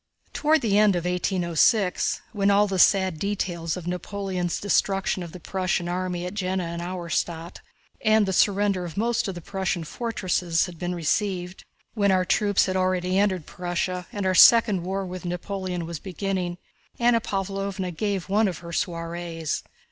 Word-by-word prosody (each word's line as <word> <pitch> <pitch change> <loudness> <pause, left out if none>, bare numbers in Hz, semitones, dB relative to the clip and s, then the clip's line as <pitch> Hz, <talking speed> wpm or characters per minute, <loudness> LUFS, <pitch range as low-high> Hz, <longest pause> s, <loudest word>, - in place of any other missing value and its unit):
Toward 310 0 +3
the 210 -3 +3
end 210 -3 +5
of 175 0 -2
1806, 180 +2 +1
when 200 -2 +2
all 200 +1 +5
the 195 -2 -2
sad 190 -4 +4
details 175 -4 -2
of 180 - -7
Napoleon's 180 0 -3
destruction 195 -2 +1
of 170 -2 -7
the 180 - -9
Prussian 185 0 -1
army 180 0 -2
at 180 - -5
Jena 190 -2 -1
and 170 0 -4
Auerstädt 170 -1 -3 0.5
and 215 -1 +4
the 190 - -1
surrender 200 -1 +2
of 170 -1 -7
most 235 +2 +1
of 195 - -4
the 175 - -7
Prussian 190 -1 -2
fortresses 180 -4 -1
had 175 -3 -10
been 180 0 -2
received, 180 +2 -2 0.3
when 200 -3 +2
our 185 -1 +2
troops 205 +2 +2
had 185 - -2
already 185 0 +1
entered 190 -6 +1
Prussia 180 0 -3
and 205 -2 -3
our 185 - +2
second 215 -1 +7
war 190 +2 -3
with 185 -1 -7
Napoleon 180 0 -4
was 165 -2 -5
beginning, 185 -1 -3 0.4
Anna 235 -1 +3
Pávlovna 195 -2 -3
gave 200 0 -2
one 210 +2 +3
of 180 -4 -3
her 170 - -7
soirees. 170 -2 -3
185 Hz, 165 wpm, -25 LUFS, 175-200 Hz, 0.5 s, second